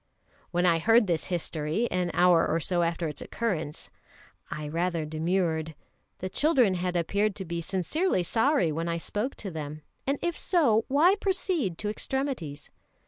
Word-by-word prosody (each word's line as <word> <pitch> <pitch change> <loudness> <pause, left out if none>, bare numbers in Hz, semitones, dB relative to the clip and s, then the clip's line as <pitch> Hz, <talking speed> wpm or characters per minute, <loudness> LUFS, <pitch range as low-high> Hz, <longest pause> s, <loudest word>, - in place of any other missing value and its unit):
When 175 +1 +1
I 170 -2 +4
heard 225 +6 +5
this 170 -4 0
history, 170 +3 -1
an 180 -1 0
hour 175 -2 +5
or 165 - +1
so 175 +1 0
after 170 0 0
its 150 - -6
occurrence, 170 -10 -3 0.6
I 150 -1 -5
rather 165 +1 -1
demurred. 160 0 -1 0.4
The 185 - -4
children 260 - +3
had 180 0 -2
appeared 200 +4 +1
to 190 - -6
be 170 0 -3
sincerely 190 - 0
sorry 225 - +2
when 165 +2 -2
I 170 - -1
spoke 210 +9 -2
to 195 - -6
them, 155 -1 -6 0.2
and 275 +1 +1
if 345 -1 -1
so, 240 - +3
why 310 +8 +5
proceed 365 - 0
to 210 - -3
extremities? 215 - -3
180 Hz, 160 wpm, -28 LUFS, 165-230 Hz, 0.6 s, heard